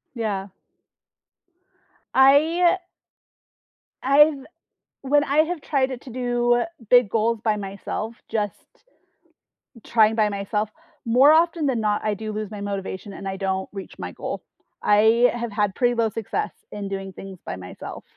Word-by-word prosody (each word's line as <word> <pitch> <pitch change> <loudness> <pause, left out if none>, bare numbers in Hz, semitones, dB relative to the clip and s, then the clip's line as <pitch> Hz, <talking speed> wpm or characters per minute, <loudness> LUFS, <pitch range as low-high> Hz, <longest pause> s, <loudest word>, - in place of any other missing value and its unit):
Yeah. 205 -4 -2 1.7
I 315 +7 +5 1.2
I've 280 +1 +4 0.6
when 290 +2 +3
I 285 +1 0
have 320 +1 +2
tried 270 -3 0
it 255 -2 -6
to 260 - -11
do 240 0 +1 0.3
big 245 -4 +6
goals 225 +1 0
by 215 -1 +1
myself, 200 +3 -5
just 210 -3 -3 1.2
trying 220 -1 +4
by 215 -2 +3
myself, 210 +1 -2 0.4
more 255 +6 +6
often 330 0 +3
than 260 -4 +1
not, 210 -1 0
I 215 - 0
do 215 +1 -5
lose 215 -1 -4
my 210 - -7
motivation, 200 0 -5
and 195 - -7
I 190 0 -3
don't 190 -1 -2
reach 195 -2 -9
my - - -6
goal. - - -6 0.4
I 220 +4 +5
have 235 -1 -4
had 205 -2 0
pretty 245 +2 +1
low 230 -1 +1
success 220 0 -3 0.2
in 200 -1 -5
doing 195 -1 -5
things 190 -1 -10
by - - -4
myself. 90 0 -9
225 Hz, 145 wpm, -23 LUFS, 205-260 Hz, 1.7 s, big